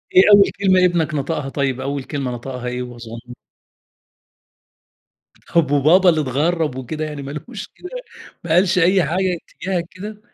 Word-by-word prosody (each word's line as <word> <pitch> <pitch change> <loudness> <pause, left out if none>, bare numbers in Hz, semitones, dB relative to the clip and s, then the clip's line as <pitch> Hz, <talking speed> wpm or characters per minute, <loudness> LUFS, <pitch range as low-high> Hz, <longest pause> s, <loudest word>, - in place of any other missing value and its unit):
إيه 185 - +9
أول 200 -1 +7
كلمة 185 -2 +4
ابنك 165 -4 +1
نطقها 145 -1 -2
طيب؟ 135 -2 -2
أول 140 0 -3
كلمة 135 -3 -4
نطقها 125 +1 -6
إيه 125 0 -3
وهو 120 -1 -9
صغن 115 +1 -10 2.2
طب 150 -4 +3
وبابا 165 +6 +5
اللي 160 -2 +2
اتغرّب 150 +2 0
وكده 155 +5 -4
يعني 150 -2 -6
ما 140 +1 -7
لوش 210 +8 -7
كده، 360 - -12 0.5
ما 170 - -8
قالش 180 +1 +4
أي 185 +1 +4
حاجة 180 +4 0
اتجاهك 180 -3 -3
كده؟ 210 +3 -9
155 Hz, 155 wpm, -20 LUFS, 135-180 Hz, 2.2 s, إيه